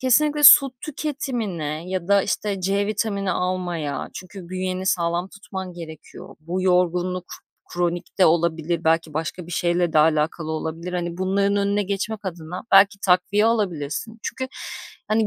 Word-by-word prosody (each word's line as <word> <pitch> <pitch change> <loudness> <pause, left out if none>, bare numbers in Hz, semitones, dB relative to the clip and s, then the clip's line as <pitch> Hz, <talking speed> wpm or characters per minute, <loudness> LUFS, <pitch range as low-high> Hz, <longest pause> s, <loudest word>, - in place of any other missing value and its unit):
kesinlikle 295 +4 +3
su 275 0 +9
tüketimine 220 - -4
ya 185 -1 -3
da, 200 -1 +5
işte, 200 -3 -2
c 200 +2 0
vitamini 200 -2 -1
almaya 175 -5 -2
çünkü 185 -1 -9
bünyeni 185 0 -3
sağlam 170 0 0
tutman 190 -2 -7
gerekiyor, 165 -2 -11
bu 180 +4 -3
yorgunluk 180 0 +1 0.5
kronik 175 +1 -2
de 185 - +6
olabilir, 165 0 +1
belki 160 -1 +1
başka 165 +2 -4
bir 175 - -8
şeyle 175 -1 +1
de 155 - +4
alakalı 155 +1 +2
olabilir, 160 +3 -4
hani, 175 0 -3
bunların 200 +2 +1
önüne 200 +1 +1
geçmek 200 +2 -3
adına 175 0 -6
belki 200 +1 +6
takviye 190 +3 +3
alabilirsin. 205 -1 -1
Çünkü, 260 0 -4 0.6
hani, 215 0 +2
185 Hz, 140 wpm, -23 LUFS, 170-200 Hz, 0.6 s, su